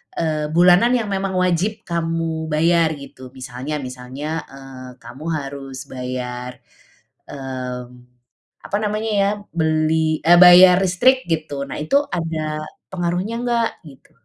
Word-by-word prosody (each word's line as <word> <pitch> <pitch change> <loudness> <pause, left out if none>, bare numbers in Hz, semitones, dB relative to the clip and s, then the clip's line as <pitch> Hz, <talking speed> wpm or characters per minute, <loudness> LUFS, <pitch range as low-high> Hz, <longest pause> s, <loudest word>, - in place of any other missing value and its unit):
eee, 155 -2 -1
bulanan 180 +8 +5
yang 225 -4 0
memang 195 -1 -2
wajib 185 +4 0
kamu 165 -1 -2
bayar 160 +1 +2
gitu. 135 -3 -12
Misalnya 130 +3 -6
misalnya, 130 +5 -6
eee, 135 -2 -11
kamu 120 +6 -11
harus 135 -3 -6
bayar, 125 -1 -6 0.7
mmm, 130 -2 -6 0.8
apa 200 - -1
namanya 215 +1 -2
ya, 195 - +3 0.2
beli, 160 -1 +1
e 170 - +7
bayar 180 +1 +9
listrik 255 +9 +3
gitu. 155 -4 -2
Nah, - - -5
itu 275 - +2
ada 155 -2 -3 0.3
pengaruhnya 180 +4 -2
enggak? 235 -2 +1 0.2
Gitu. 135 -4 -16
160 Hz, 120 wpm, -20 LUFS, 135-180 Hz, 0.8 s, bayar